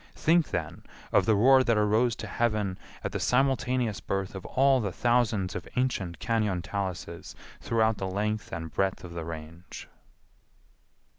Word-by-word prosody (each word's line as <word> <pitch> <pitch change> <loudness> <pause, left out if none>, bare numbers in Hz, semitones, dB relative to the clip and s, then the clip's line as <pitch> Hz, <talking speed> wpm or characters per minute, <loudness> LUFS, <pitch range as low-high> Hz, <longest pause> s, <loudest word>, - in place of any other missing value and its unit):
Think, 165 0 +3
then, 80 -3 -4 0.3
of - - +3
the 110 - +5
roar 130 +5 +6
that 115 -3 +2
arose 110 +3 +2
to - - -7
heaven 105 -3 -1 0.2
at - - -2
the - - -3
simultaneous 125 -4 +1
birth 95 +2 -3
of 95 -2 -7
all 135 -1 +3
the 100 -3 -2
thousands 110 -4 +1
of 90 - -5
ancient 110 -9 -1
cañon 105 -6 0
taluses 90 -4 -5 0.2
throughout 110 -1 +1
the 95 - -2
length 105 +3 -2
and 80 -2 -6
breadth 95 -1 0
of 85 -1 -8
the 85 -2 -5
Range! 80 +2 -9
105 Hz, 155 wpm, -28 LUFS, 90-120 Hz, 0.3 s, roar